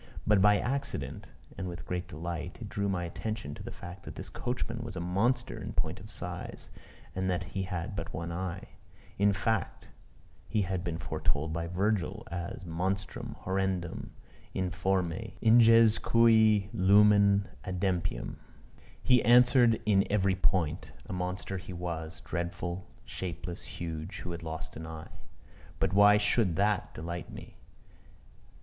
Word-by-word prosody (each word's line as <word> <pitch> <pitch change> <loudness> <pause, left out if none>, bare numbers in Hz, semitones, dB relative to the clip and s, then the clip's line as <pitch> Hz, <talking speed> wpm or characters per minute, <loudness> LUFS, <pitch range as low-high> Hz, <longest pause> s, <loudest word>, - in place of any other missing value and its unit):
But 105 -2 +4
by 105 +1 +6
accident, 135 +2 -3 0.3
and 95 - -3
with 90 0 -7
great 90 0 -3
delight, 85 +1 -5
it 110 -4 -7
drew 100 0 -1
my 90 -2 -1
attention 85 -2 -4
to - - -9
the - - -6
fact 90 +2 -9
that - - -9
this - - -7
coachman 120 -1 -3
was 115 -4 -6
a - - -3
monster 100 +9 0
in - - -5
point - - -1
of - - -11
size, - - -6 0.4
and 95 0 -1
that 90 0 0
he 95 - -1
had 90 +1 -3
but 85 -3 -4
one 85 +2 -4
eye. 90 +1 -4 0.5
In 100 0 +5
fact 105 -1 -1 0.6
he 105 - +1
had 95 -1 -2
been 85 -3 -2
foretold 80 -1 -1
by 85 0 -2
Virgil 95 +2 0
as 85 +1 -5
"Monstrum. 90 +4 -3
horrendum, 95 -2 -2 0.5
informe, 90 -1 -1
ingens 115 -1 +6
cui 110 -3 +5
lumen 100 +1 +5 0.2
adempium." 90 -2 -2 0.7
He 125 -2 +5
answered 120 -1 +6
in 100 -2 +4
every 100 -2 +3
point 90 -4 0
a - - -6
monster 90 +1 -3
he 90 0 -8
was 85 -1 -5
dreadful, 85 +2 -4 0.2
shapeless, 90 -1 -5
huge, 80 +1 -5
who 90 - -5
had 85 0 -5
lost 80 0 -6
an 80 +2 -7
eye. 80 -1 -9 0.6
But - - 0
why 105 +1 +7
should 105 -3 +2
that 100 +1 +1
delight 85 +1 -5
me? - - -11
95 Hz, 145 wpm, -30 LUFS, 85-105 Hz, 0.7 s, why